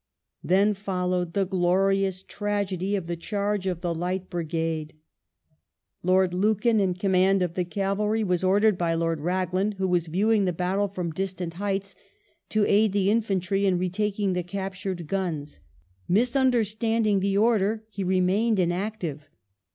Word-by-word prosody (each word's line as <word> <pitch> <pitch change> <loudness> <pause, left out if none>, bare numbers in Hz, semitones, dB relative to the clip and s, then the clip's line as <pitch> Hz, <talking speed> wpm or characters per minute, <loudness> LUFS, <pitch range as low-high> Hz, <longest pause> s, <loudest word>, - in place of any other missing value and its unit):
Then 200 +4 +3
followed 180 -3 -2
the 200 -1 +1
glorious 190 +1 +1
tragedy 200 -2 -2
of 190 -4 -3
the 170 0 -3
charge 200 +2 -2
of 180 -2 -2
the 175 -2 -1
Light 180 +3 -3
Brigade. 165 -2 -3 1.1
Lord 185 0 +2
Lucan, 215 +4 +2
in 190 -3 +1
command 190 0 +2
of 175 -2 -2
the 180 - 0
cavalry, 205 +4 -1
was 180 -2 0
ordered 200 +1 +3
by 165 -1 +1
Lord 165 -1 0
Raglan, 185 +4 0
who 190 -1 -2
was 175 -2 +1
viewing 205 +5 +2
the 180 - 0
battle 185 +4 0
from 180 -4 -4
distant 185 0 -4
heights, 195 +1 -3 0.5
to 215 -1 +2
aid 210 0 +3
the 200 0 +2
infantry 200 -3 0
in 185 -2 +2
retaking 195 +2 -1
the 180 - 0
captured 190 -1 -5
guns. 155 - -3 0.5
Mis 235 +7 +2
undei 255 -4 +3
standing 220 -1 +1
the 195 +1 0
order, 220 0 +2
he 200 -2 -4
remained 190 +5 +2
inactive. 175 -4 -2
190 Hz, 150 wpm, -26 LUFS, 180-205 Hz, 1.1 s, Then